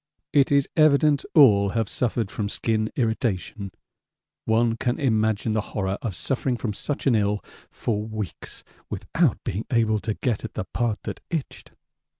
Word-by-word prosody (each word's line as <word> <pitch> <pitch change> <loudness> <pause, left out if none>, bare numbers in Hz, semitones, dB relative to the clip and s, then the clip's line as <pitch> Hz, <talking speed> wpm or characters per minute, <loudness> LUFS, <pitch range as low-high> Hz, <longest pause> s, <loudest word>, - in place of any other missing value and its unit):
It 140 -1 +4
is 140 -1 +4
evident 150 -2 +4
all 105 -10 +7
have 115 -2 +1
suffered 115 -2 -1
from 105 -2 -3
skin 110 0 0
irritation 110 -4 -1 0.8
one 115 +1 +2
can 120 +5 -1
imagine 110 -4 +1
the 110 - +1
horror 95 -2 -3
of 105 -6 -3
suffering 130 +2 -1
from 110 -3 -3
such 145 +7 -3
an 135 - +4
ill 105 -1 +1 0.2
for 105 -2 -2
weeks 110 -3 -6 0.3
without - - 0
being 100 +5 -3
able 110 -3 +2
to 110 0 -3
get 120 -6 -1
at 110 - -7
the - - -2
part 115 +3 -2
that - - -5
itched. 160 -5 -5
110 Hz, 155 wpm, -24 LUFS, 105-125 Hz, 0.8 s, all